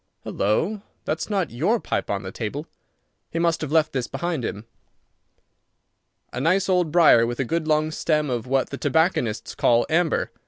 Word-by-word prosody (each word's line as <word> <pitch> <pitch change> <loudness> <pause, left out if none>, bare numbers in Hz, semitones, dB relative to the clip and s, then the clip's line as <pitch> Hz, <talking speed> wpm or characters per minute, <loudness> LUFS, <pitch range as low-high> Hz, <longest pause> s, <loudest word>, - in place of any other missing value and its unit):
Halloa! 165 - -1 0.2
That's 155 +6 -2
not 195 -6 -1
your 175 - +1
pipe - - -3
on 100 0 -2
the 95 - -6
table. 120 +10 -5 0.6
He - - -5
must 170 -1 +1
have 150 -3 -4
left 155 -1 +2
his 130 -3 -2
behind 160 0 -3
him. 105 0 -5 1.7
A 125 - -3
nice 185 +6 +2
old 180 -4 +2
briar 155 -9 +6
with 120 +2 -4
a 135 - 0
good 165 +4 -2
long 155 0 +2
stem 155 -1 0
of 120 -2 -3
what 135 0 0
the 140 - -5
tobacconists 145 - 0
call 120 0 +3
amber. 165 0 +1
155 Hz, 170 wpm, -23 LUFS, 120-170 Hz, 1.7 s, briar